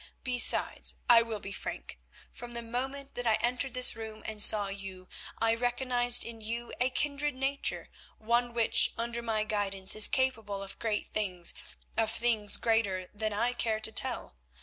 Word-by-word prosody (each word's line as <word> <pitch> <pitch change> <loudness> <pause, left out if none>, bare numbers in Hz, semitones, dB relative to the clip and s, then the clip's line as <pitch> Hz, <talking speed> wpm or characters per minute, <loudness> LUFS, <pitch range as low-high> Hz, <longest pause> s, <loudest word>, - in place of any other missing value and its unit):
Besides, 250 -2 +3
I 235 -1 +7
will 225 -2 -4
be 195 - -8
frank; 190 - -6 0.3
from 240 0 -9
the 235 0 -5
moment 265 +4 -5
that 245 -1 -4
I 220 - +4
entered 250 +3 -2
this 255 0 +6
room 220 -1 -9
and 215 -1 -4
saw 205 -1 +6
you, 195 -2 -8 0.3
I 225 0 +2
recognised 245 0 +3
in 230 -1 -8
you 235 +2 -5
a 255 - +2
kindred 290 +1 -1
nature, 270 +2 -1 0.3
one 235 +2 0
which 230 -1 +3
under 235 0 -3
my 220 -2 -1
guidance 195 -3 -2
is 215 - +8
capable 225 -7 -1
of 195 - -8
great 220 -2 -2
things, 180 -5 -2 0.4
of 225 -1 +1
things 225 -3 +1
greater 200 -5 -1
than 215 +1 -3
I 235 +4 -1
care 225 -2 -1
to 220 - -2
tell. 205 - -1
230 Hz, 170 wpm, -30 LUFS, 210-245 Hz, 0.4 s, is